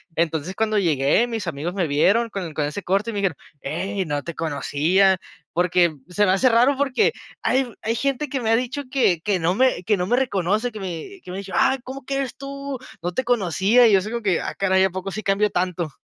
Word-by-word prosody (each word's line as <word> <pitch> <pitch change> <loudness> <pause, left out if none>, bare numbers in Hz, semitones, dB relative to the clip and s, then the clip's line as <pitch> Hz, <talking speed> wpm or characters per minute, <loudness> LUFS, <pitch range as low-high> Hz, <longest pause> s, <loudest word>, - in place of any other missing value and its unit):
Entonces 160 +2 -1
cuando 215 0 +1
llegué, 155 - +2
mis 225 -4 -4
amigos 165 +1 -4
me 185 -4 0
vieron 200 +11 +3
con 185 -6 -5
con 150 -1 -1
ese 150 +7 -4
corte 195 +6 0
y - - -9
me 205 - -2
dijeron: 190 -7 0 0.2
Ey, 190 +7 -3
no 145 -2 -2
te 170 - -6
conocía", 165 +5 +2 0.3
porque 175 -1 +2 0.2
se 205 +3 +2
me 185 - +3
hace 225 +7 +4
raro, 245 +4 +4
porque 270 -2 +2 0.3
hay 260 -1 +1
hay 225 +1 0
gente 275 +3 -1
que 270 - -2
me 225 - -1
ha 225 - +5
dicho 255 +4 -2
que 250 - +2
que 200 +1 +1
no 170 +1 +1
me 255 -4 +2
que 210 +3 +2
no 180 -2 -2
me 240 - +3
reconoce, 215 -1 0
que 215 - -8
me 190 - -6
que - - -12
me 180 - -5
ha - - -3
dicho: 195 -2 -8
"Ah, 265 - +3
¿cómo 265 +2 -8
que 275 - -3
eres 270 -2 -2
tú? 275 -1 -6 0.2
No 175 - -1
te 260 - -1
conocía", 225 0 +3
y - - +4
yo: 195 - +6 0.4
"Ah, - - -5
caray, 190 -1 +2
¿a - - +1
poco 185 +1 -5
sí 215 - -4
cambio 200 +1 +1
tanto?" 175 -4 -2
195 Hz, 230 wpm, -22 LUFS, 175-240 Hz, 0.4 s, yo